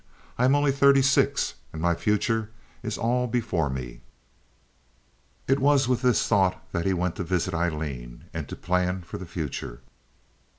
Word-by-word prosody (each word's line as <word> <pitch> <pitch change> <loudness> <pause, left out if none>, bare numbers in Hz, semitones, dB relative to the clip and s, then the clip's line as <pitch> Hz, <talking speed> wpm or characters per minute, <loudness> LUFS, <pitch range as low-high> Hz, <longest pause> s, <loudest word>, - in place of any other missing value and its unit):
I 125 - +2
am 135 +2 +5
only 145 -1 +3
thirty 140 0 +5
six, 135 0 +2 0.2
and 80 - -7
my 85 +1 +2
future 105 +4 0 0.3
is 110 -3 -3
all 125 +2 +1
before 110 - 0
me." - - -6 1.5
It 135 +1 +3
was 140 -1 +4
with 125 -2 +1
this 125 -2 +2
thought 95 -4 +2
that 85 +2 -1
he - - +3
went 90 -1 -1
to 95 - -2
visit 90 0 -1
Aileen, 75 -8 -3
and - - -5
to - - -5
plan 90 0 -1
for 85 - -8
the 95 - -8
future. 75 -7 -5
95 Hz, 165 wpm, -26 LUFS, 85-125 Hz, 1.5 s, am